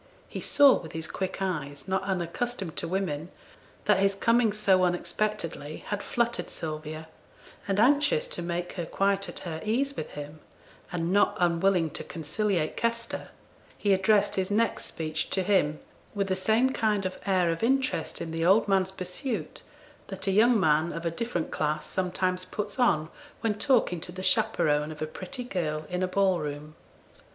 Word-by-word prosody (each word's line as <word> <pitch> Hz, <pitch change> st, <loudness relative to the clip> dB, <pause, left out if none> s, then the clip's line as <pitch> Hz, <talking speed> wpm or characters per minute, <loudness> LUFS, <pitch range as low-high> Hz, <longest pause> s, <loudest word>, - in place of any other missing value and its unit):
He -, -, -6 dB
saw 285 Hz, -2 st, +6 dB
with 160 Hz, -, -10 dB
his 160 Hz, 0 st, -4 dB
quick 190 Hz, 0 st, -3 dB
eyes, 145 Hz, -5 st, -3 dB
not 190 Hz, 0 st, +1 dB
unaccustomed 190 Hz, +1 st, -3 dB
to -, -, -2 dB
women, 170 Hz, -3 st, -2 dB, 0.6 s
that 210 Hz, -2 st, +4 dB
his 195 Hz, 0 st, +3 dB
coming 230 Hz, +2 st, +3 dB
so 200 Hz, -3 st, +3 dB
unexpectedly 175 Hz, -3 st, -2 dB
had 205 Hz, -1 st, -2 dB
fluttered 235 Hz, 0 st, -1 dB
Sylvia, 155 Hz, 0 st, -6 dB, 0.6 s
and 195 Hz, 0 st, +1 dB
anxious 290 Hz, -, +4 dB
to -, -, -2 dB
make 175 Hz, +1 st, -3 dB
her 175 Hz, -3 st, -4 dB
quite 195 Hz, 0 st, 0 dB
at -, -, -8 dB
her 160 Hz, -2 st, -5 dB
ease 265 Hz, +6 st, 0 dB
with 155 Hz, -, -5 dB
him, 150 Hz, +1 st, -8 dB, 0.5 s
and 175 Hz, 0 st, -1 dB
not 205 Hz, -, +3 dB
unwilling 175 Hz, -1 st, +2 dB
to -, -, -6 dB
conciliate 170 Hz, +1 st, -1 dB
Kester, 230 Hz, 0 st, -2 dB, 0.5 s
he 200 Hz, -2 st, +2 dB
addressed 195 Hz, +2 st, +3 dB
his 185 Hz, -1 st, 0 dB
next 225 Hz, +3 st, +1 dB
speech 155 Hz, -1 st, -3 dB
to 190 Hz, -, +1 dB
him, 180 Hz, -7 st, +2 dB, 0.4 s
with 200 Hz, -1 st, -1 dB
the 185 Hz, -, +2 dB
same 220 Hz, +7 st, +3 dB
kind 210 Hz, -6 st, +1 dB
of 185 Hz, 0 st, -4 dB
air 185 Hz, -3 st, +3 dB
of 165 Hz, -, -3 dB
interest 265 Hz, +4 st, 0 dB
in 165 Hz, -, -4 dB
the 165 Hz, 0 st, -2 dB
old 195 Hz, +6 st, +5 dB
man's 190 Hz, -1 st, +2 dB
pursuit 190 Hz, +7 st, -4 dB, 0.5 s
that 195 Hz, -1 st, -5 dB
a 195 Hz, -, +2 dB
young 225 Hz, +4 st, +5 dB
man 160 Hz, -1 st, +3 dB
of 165 Hz, 0 st, -5 dB
a 170 Hz, -, +1 dB
different 175 Hz, -2 st, -3 dB
class 150 Hz, 0 st, -1 dB
sometimes 185 Hz, 0 st, -1 dB
puts 205 Hz, +7 st, -5 dB
on 160 Hz, -11 st, +3 dB, 0.3 s
when 225 Hz, -2 st, +1 dB
talking 210 Hz, -, +2 dB
to 175 Hz, -, -6 dB
the 185 Hz, +1 st, -7 dB
chaperone 150 Hz, -4 st, +2 dB
of 155 Hz, -, -9 dB
a 155 Hz, -, -1 dB
pretty 190 Hz, -, -6 dB
girl 155 Hz, -9 st, -2 dB
in 180 Hz, 0 st, -1 dB
a 185 Hz, -, +2 dB
ball 190 Hz, -1 st, +2 dB
room. 150 Hz, +1 st, -5 dB
185 Hz, 175 wpm, -28 LUFS, 165-210 Hz, 0.6 s, saw